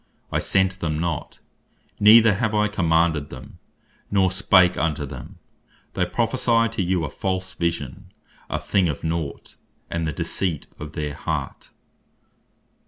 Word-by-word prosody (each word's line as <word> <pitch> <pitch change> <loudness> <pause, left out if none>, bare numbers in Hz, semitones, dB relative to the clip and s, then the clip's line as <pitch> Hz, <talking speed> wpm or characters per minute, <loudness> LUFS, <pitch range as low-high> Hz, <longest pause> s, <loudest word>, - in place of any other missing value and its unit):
I - - +1
sent 95 -1 +1
them 80 -2 -1
not, 85 -2 -3 0.6
neither 110 +1 +8
have 110 +1 -1
I 105 0 +3
commanded 80 -6 +1
them, - - -11 0.5
nor 95 -2 +3
spake 95 -1 +4
unto 75 -3 -1
them, 65 -3 -9 0.6
they - - 0
prophecy 115 -1 +2
to 115 - -2
you 90 -2 0
a - - -4
false 95 -1 -3
Vision, 85 -1 -3 0.4
a - - -1
thing 95 -4 +1
of 75 - -4
naught; 80 -3 -4 0.3
and 85 -1 -1
the - - -1
deceit 80 +1 -2
of 75 +1 -8
their 75 -3 -3
heart." - - -4
85 Hz, 140 wpm, -23 LUFS, 80-95 Hz, 0.6 s, neither